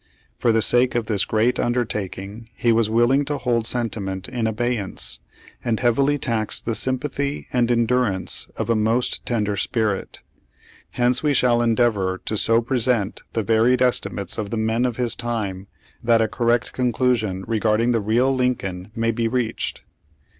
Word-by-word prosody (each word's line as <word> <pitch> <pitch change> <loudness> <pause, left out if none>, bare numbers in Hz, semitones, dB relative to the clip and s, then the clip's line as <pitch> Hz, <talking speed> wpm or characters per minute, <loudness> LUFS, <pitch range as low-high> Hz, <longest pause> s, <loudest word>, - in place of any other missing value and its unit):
For 120 - +3
the 110 -1 +3
sake 125 +2 +3
of 120 -2 0
this 105 -3 0
great 115 +3 +1
undertaking 110 -2 -3
he 120 - +2
was 115 -1 +2
willing 120 +5 +3
to 145 +1 -2
hold 120 -3 0
sentiment 100 -6 -2
in 115 -3 -2
abeyance, 110 -2 -2 0.4
and 115 -2 0
heavily 135 +4 +2
tax 115 -5 -1
the 115 - -3
sympathy 135 +4 -2
and 120 -1 +2
en 120 -1 +3
durance 115 -6 0
of - - -1
a - - +3
most 110 +3 0
tender 105 -4 0
spirit. 105 -1 -2 0.7
Hence 125 0 +1
we 150 -2 +1
shall 120 -2 +3
endeavor 110 -5 +1
to 110 - -2
so 115 +2 +2
present 120 -4 0
the 110 - 0
varied 115 +4 +3
estimates 105 -6 -1
of 105 -2 -3
the 115 - -3
men 110 +3 +1
of 125 -2 -1
his 125 -2 +1
time, 100 -5 -4 0.4
that 115 -1 +4
a 110 - +2
correct 120 +2 0
conclusion 120 -6 0
regard 110 -1 +1
ing 120 +1 +2
the 115 -2 +1
real 120 +6 +2
Lincoln 105 -7 -2
may 115 0 +1
be 115 0 -1
reached. 120 -1 -2
115 Hz, 165 wpm, -22 LUFS, 110-125 Hz, 0.7 s, that